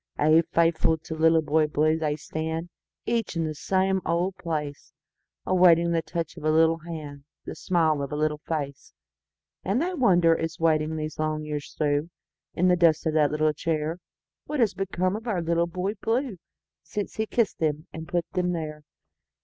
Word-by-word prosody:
Ay, 155 +2 +5
faithful 165 0 +3
to 160 +1 -8
Little 160 0 +3
Boy 155 +1 +2
Blue 155 +1 +2
they 155 -2 -1
stand, 160 +2 -4 0.4
Each 230 -5 -1
in 165 - 0
the 155 -1 -2
same 190 +4 0
old 175 +3 0
place, 150 -5 -5 0.5
Awaiting 170 -2 +5
the 165 -1 +1
touch 165 0 -5
of 160 - -9
a 155 - +2
little 160 +1 +4
hand, 155 -4 -8 0.2
The - - -5
smile 160 -2 +1
of 140 - -4
a - - -2
little 150 0 0
face; 145 -3 -5 0.7
And 200 +6 0
they 355 +5 -1
wonder, 175 - +4
as 165 0 -4
waiting 160 -1 +2
the 155 -1 -2
long 155 0 -1
years 150 -1 -5
throughIn 145 +1 +1 0.5
the 180 +1 +4
dust 170 -3 +3
of 160 - +1
that 150 -2 +3
little 155 0 +1
chair, 160 +2 -2 0.5
What 300 -1 -3
has 220 -5 +3
become 185 0 -1
of 225 +3 -7
our 205 -6 0
Little 170 0 +1
Boy 185 +4 -2
Blue, 235 -2 -1 0.4
Since 205 -1 -5
he 220 0 -1
kissed 230 -2 0
them 155 0 -1
and 160 0 -7
put 175 -1 -1
them 180 -1 0
there. 155 -2 -5
165 Hz, 180 wpm, -26 LUFS, 155-180 Hz, 0.7 s, Ay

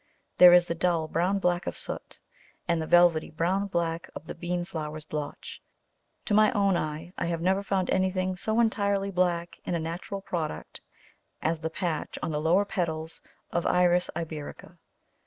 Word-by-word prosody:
There 180 -1 +11
is 175 0 +7
the - - -1
dull 170 -1 0
brown 180 +5 +1
black 180 -1 0
of - - -3
soot, - - -6 0.5
and 170 -2 +1
the 160 - -4
velvety 175 -2 +5
brown 180 +5 0
black 170 -3 -2
of - - -8
the - - -6
bean 175 +1 -3
flower's 155 -3 -5
blotch; 150 -1 -6 0.6
to 210 - -1
my 215 0 +5
own 200 -3 +3
eye, 155 +2 -4
I - - 0
have 170 -1 -1
never 190 +3 +1
found 195 -2 -1
anything 185 0 +1
so 220 +5 0
entirely 200 -3 +1
black 175 -2 0
in 175 - -2
a - - 0
natural 170 +5 -5
product 160 - -5 0.6
as 160 +1 -1
the 160 +1 -3
patch 165 -2 -3
on - - -1
the 150 0 -1
lower 175 +6 +3
petals 160 -4 -3 0.3
of 170 - 0
Iris 180 0 +3
iberica. 155 -3 -7
175 Hz, 175 wpm, -28 LUFS, 160-185 Hz, 0.6 s, There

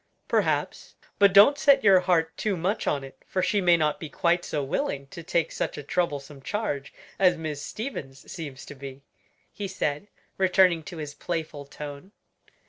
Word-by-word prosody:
"Perhaps; - - -1 0.2
but 200 -1 +6
don't 210 +10 +7
set 275 -1 +5
your 195 -3 +7
heart 170 -3 +1
too 205 -4 -1
much 190 +6 -1
on 140 -2 0
it, 135 - -12
for 185 - -1
she 200 +2 +2
may 175 -2 +5
not 155 -2 0
be 160 - -7
quite 175 +4 +1
so 145 - -2
willing 135 0 -2
to 170 - -8
take 170 0 0
such - - -3
a 145 - -6
troublesome 145 -3 -2
charge 145 -6 -3 0.3
as 180 -2 +4
Miss 155 -3 -4
Stevens 145 - -7
seems 145 -6 -7
to - - -9
be," 135 0 -10 0.5
he 205 - -4
said, 170 -2 -2 0.3
returning 185 -2 +4
to 170 - -8
his 150 -2 -6
playful 155 -3 -4
tone. 145 +6 -9
165 Hz, 175 wpm, -26 LUFS, 145-190 Hz, 0.5 s, don't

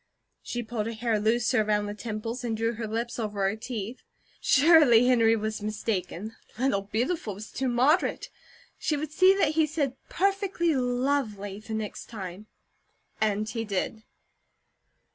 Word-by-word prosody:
She 240 0 -4
pulled 220 -1 -3
her 230 - -3
hair 225 -1 0
looser 220 +1 +2
around 210 -1 +1
the 205 - -4
temples, 225 +3 -5
and 225 -2 -2
drew 230 +1 0
her 225 0 -4
lips 230 +3 -3
over 205 -3 -1
her 195 - -1
teeth. 225 0 -6 0.4
Surely 280 -5 +6
Henry 230 -3 +4
was 215 0 -3
mistaken. 210 -1 -3 0.2
"Little 245 -5 +1
Beautiful" 220 - -2
was 210 +3 -9
too 265 - -2
moderate. 255 +8 +2 0.5
She 300 - 0
would 305 0 -4
see 370 +4 +5
that 390 - +2
he 315 0 +2
said 285 -4 -1
"perfectly 390 -3 +1
lovely," 245 -6 -1
the 220 +1 -6
next 215 -1 -5
time, 195 -2 -8 0.7
and 215 0 +1
he 225 0 -3
did. 210 +1 -2
225 Hz, 150 wpm, -27 LUFS, 215-260 Hz, 0.7 s, Surely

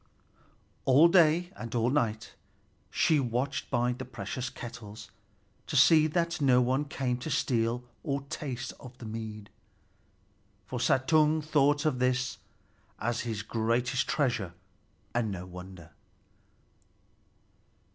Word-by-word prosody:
All 145 +6 +6
day 175 +1 +4
and 115 0 -6
all 120 +1 +2
night 115 -6 -1 0.6
she 155 -2 +3
watched 130 +2 -2
by 120 +1 +1
the 125 +1 -6
precious 125 0 -5
kettles, 110 -3 -9 0.6
to - - -4
see 155 -1 +6
that 170 +1 -1
no 130 -3 +5
one 130 +4 +1
came 130 -3 -2
to 145 - -5
steal 120 -3 0 0.2
or 140 -3 -2
taste 130 -3 -5
of 125 -1 -12
the 120 - -10
mead; 110 -1 -7 1.1
for - - -5
Suttung 155 +3 +3
thought 145 -1 +2
of 130 -5 0
it 125 0 +1 0.6
as 120 +1 -1
his 110 -3 -3
greatest 120 +4 0
treasure, 115 - 0 0.6
and 120 -2 0
no 90 -2 -5
wonder. 90 -2 -11
125 Hz, 120 wpm, -29 LUFS, 115-145 Hz, 1.1 s, All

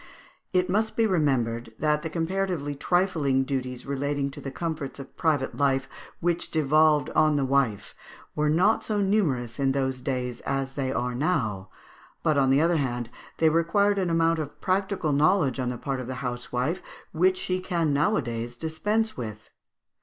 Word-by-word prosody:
It 185 -1 +2
must 215 +4 0
be 230 - +3
remembered 120 - 0
that 150 0 +1
the 160 - -4
comparatively 170 -3 -1
trifling 150 -4 +1
duties 130 -2 -4
relating 140 0 -1
to - - -9
the 135 - -5
comforts 150 -2 -4
of 135 - -10
private 150 -5 0
life, 135 -2 +1 0.3
which 175 0 -1
devolved 155 -1 +3
on 155 -1 +3
the 140 -2 +1
wife, 130 -7 0 0.4
were 150 0 +1
not 180 +8 +3
so 210 -1 -1
numerous 150 - 0
in 135 -1 +2
those 130 -2 -1
days 125 -3 -3
as 135 -1 -2
they 135 -2 -2
are 125 -1 -1
now; 120 - -1 0.5
but 155 -2 +3
on 135 -2 +3
the 135 +2 +4
other 170 +1 +3
hand 120 -4 -2 0.3
they 160 - +4
required 200 +5 +2
an 185 -2 0
amount 165 0 +2
of 145 -2 -6
practical 190 -4 0
knowledge 150 -2 +3
on 125 -1 0
the 125 - -4
part 135 +1 -3
of 125 - -5
the 130 - -4
housewife 125 +6 -2 0.3
which 185 +3 +2
she 185 0 -1
can 170 -5 0
nowadays 120 - 0
dispense 210 - -1
with. 110 -3 -7
145 Hz, 170 wpm, -26 LUFS, 130-170 Hz, 0.5 s, the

